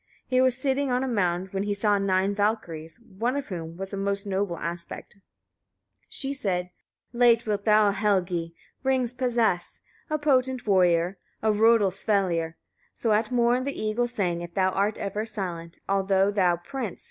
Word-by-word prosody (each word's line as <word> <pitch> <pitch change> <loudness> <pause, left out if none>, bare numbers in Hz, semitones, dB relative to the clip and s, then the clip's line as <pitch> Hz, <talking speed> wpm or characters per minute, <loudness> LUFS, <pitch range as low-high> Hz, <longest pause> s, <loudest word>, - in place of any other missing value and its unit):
As - - -35
he 255 0 +3
was 255 -2 +3
sitting 270 +1 0
on 250 +1 +1
a - - -1
mound 185 -5 0
he 200 +1 -1
saw 205 0 +2
nine 195 0 +1
Valkyriur, 200 -6 -2 0.2
one 245 +4 +1
of 285 -3 -4
whom 165 -3 -6
was 195 +1 -6
of 200 - -3
most 200 +1 -1
noble 195 -3 -1
aspect. 170 +5 -6 0.9
She 275 0 -3
said: 180 -8 -2 0.4
6. 240 - -9
Late 235 -1 +5
wilt 205 -2 -2
thou, 210 -1 +5
Helgi! 180 -5 0 0.3
rings 260 -2 +1
possess, 235 -8 0 0.3
a 305 - +1
potent 260 -4 +1
warrior, 180 -2 +3 0.2
or 220 - +4
Rodulsvellir, 195 -6 +2 0.4
so 225 - 0
at 215 +2 +1
morn 245 +1 +2
the 280 +1 -4
eagle 215 +3 0
sang 180 -8 -2
if 175 0 -8
thou 190 -1 +3
art 200 +3 0
ever 205 +2 -3
silent; 180 -6 -5
although 195 0 +2
thou, 185 -4 +3
prince! 235 +2 -5
205 Hz, 165 wpm, -26 LUFS, 185-235 Hz, 0.9 s, Late